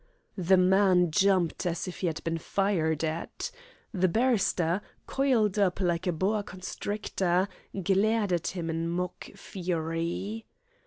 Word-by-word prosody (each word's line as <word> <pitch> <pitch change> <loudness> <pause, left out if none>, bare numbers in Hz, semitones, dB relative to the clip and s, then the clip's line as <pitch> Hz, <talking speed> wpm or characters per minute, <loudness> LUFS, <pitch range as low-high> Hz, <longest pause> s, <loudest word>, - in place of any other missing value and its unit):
The 185 +1 +4
man 185 -2 +4
jumped 185 -1 +2
as 170 +2 -2
if 180 - -6
he 185 - 0
had 160 -2 -3
been 165 0 -1
fired 165 -5 0
at. 165 - -3 0.4
The 185 -2 +2
barrister, 195 -5 +2 0.2
coiled 230 -7 +2
up 190 -2 +2
like 175 -1 0
a - - +3
boa 195 +6 0
constrictor, 190 -1 -2 0.4
glared 200 +1 +2
at 170 - 0
him 170 -3 -3
in 165 +1 -2
mock 180 +1 -3
fury. 175 +3 -3
185 Hz, 135 wpm, -28 LUFS, 170-200 Hz, 0.4 s, The